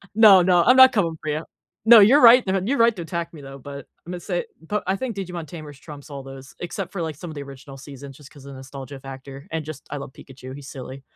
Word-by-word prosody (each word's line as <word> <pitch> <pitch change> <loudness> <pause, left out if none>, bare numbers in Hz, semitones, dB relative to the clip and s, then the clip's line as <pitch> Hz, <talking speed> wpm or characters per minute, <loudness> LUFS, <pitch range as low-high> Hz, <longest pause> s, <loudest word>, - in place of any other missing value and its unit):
No, 210 -4 +8
no, 175 -1 +3
I'm 250 - +5
not 260 0 +8
coming 170 -8 0
for 155 - -5
you. 150 +2 -2 0.4
No, 230 0 +9
you're 235 +9 +6
right 245 +1 +8
th 190 -1 -1
You're 275 +6 0
right 230 -1 +4
to 180 - -7
attack 170 +1 -5
me, 155 - -11
though. 135 0 -11
But 140 +1 -9 0.2
I'm 175 - -8
gonna 180 - -5
say 175 -1 -3 0.2
but 205 +6 -3
I 190 - +1
think 235 +2 -5
Digimon 180 -4 -6
Tamers 150 -3 -10
trumps 145 0 -12
all 140 -2 -8
those 135 0 -12
except 175 +1 -6
for, 195 - -5
like, 160 -2 -4
some 170 +4 -9
of 155 - -9
the 145 - -6
original 135 0 -12
seasons 135 0 -11
just 145 -1 -16
'cause 140 - -16
the 140 - -10
nostalgia 135 +1 -10
factor, 135 +1 -11
and 160 -1 -3
just, 155 -2 -9
I 145 - -5
love 140 -1 -9
Pikachu, 130 -1 -12
he's 140 -1 -11
silly. 135 0 -9
155 Hz, 265 wpm, -22 LUFS, 135-190 Hz, 0.4 s, No